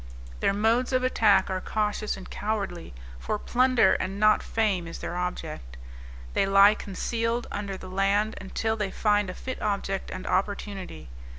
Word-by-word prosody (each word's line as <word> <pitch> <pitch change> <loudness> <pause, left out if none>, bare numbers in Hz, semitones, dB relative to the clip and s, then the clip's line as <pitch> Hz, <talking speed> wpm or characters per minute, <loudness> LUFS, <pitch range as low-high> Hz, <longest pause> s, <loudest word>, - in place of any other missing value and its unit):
Their - - +2
modes 225 +6 +2
of 255 0 +2
attack 220 -5 +4
are 185 0 -2
cautious 210 0 -1
and 190 - -10
cowardly, 200 -5 -3 0.3
for 210 - -2
plunder 245 -4 +3
and 190 +2 -2
not 215 0 +5
fame 200 -6 0
is 165 - -7
their 175 - -5
object. 120 - -5 0.6
They - - +2
lie 200 +1 +7
concealed 230 +4 -2
under 200 -2 -4
the 185 - -10
land, 195 +3 +1
until 220 +3 -2
they 210 -3 -2
find 205 -1 +1
a 185 - -6
fit 260 0 -6
object 200 -2 -2
and 185 - -6
opportunity. 190 - -3
205 Hz, 160 wpm, -27 LUFS, 190-220 Hz, 0.6 s, lie